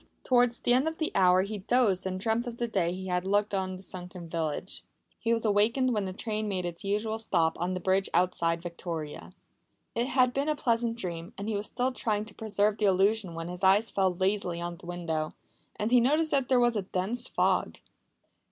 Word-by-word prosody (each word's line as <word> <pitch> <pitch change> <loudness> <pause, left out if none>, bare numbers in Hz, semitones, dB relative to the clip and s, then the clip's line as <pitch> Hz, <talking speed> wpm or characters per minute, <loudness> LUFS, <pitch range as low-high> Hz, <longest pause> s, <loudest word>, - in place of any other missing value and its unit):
Towards 245 -1 +3
the 245 - +2
end 260 +5 +3
of 320 0 -3
the 315 - -1
hour 185 -1 +5
he 205 +1 -5
dozed 200 -3 +2
and 185 0 -3
dreamt 225 +4 0
of 235 -1 -6
the 240 - -1
day 185 -6 0
he 185 +1 -6
had 180 -1 -1
looked 205 +2 +1
on 190 -1 -1
the 185 - -9
sunken 180 -2 -8
village. 160 -2 -3 0.4
He 230 - -1
was 230 0 +1
awakened 230 +5 +3
when 210 -3 0
the 190 - -3
train 215 +2 -3
made 185 -3 -2
its 170 -1 -5
usual 210 +2 -1
stop 170 -7 +1
on 180 +2 -1
the - - -2
bridge 190 +2 +1
outside 170 -2 +1
Victoria. 170 -3 -6 0.6
It 235 +2 0
had 255 -2 +3
been 280 +3 0
a 305 - +1
pleasant 230 -3 0
dream, 170 -5 -5
and 200 - -5
he 220 - -1
was 205 +1 -2
still 250 +2 -1
trying 215 -4 -1
to 215 - -12
preserve 210 -1 0
the 215 - +2
illusion 195 -1 +2
when 165 0 -5
his 180 +2 -7
eye 190 +2 +6
fell 195 -4 +1
lazily 185 -2 0
on 175 0 -4
the 170 - -13
window, 165 -3 -3 0.4
and 215 +3 -2
he 250 - +7
noticed 305 +6 +2
that 270 -3 +1
there 255 -2 +5
was 240 -1 +3
a 210 - +1
dense 195 +7 -2
fog. - - +1
200 Hz, 215 wpm, -29 LUFS, 180-230 Hz, 0.6 s, he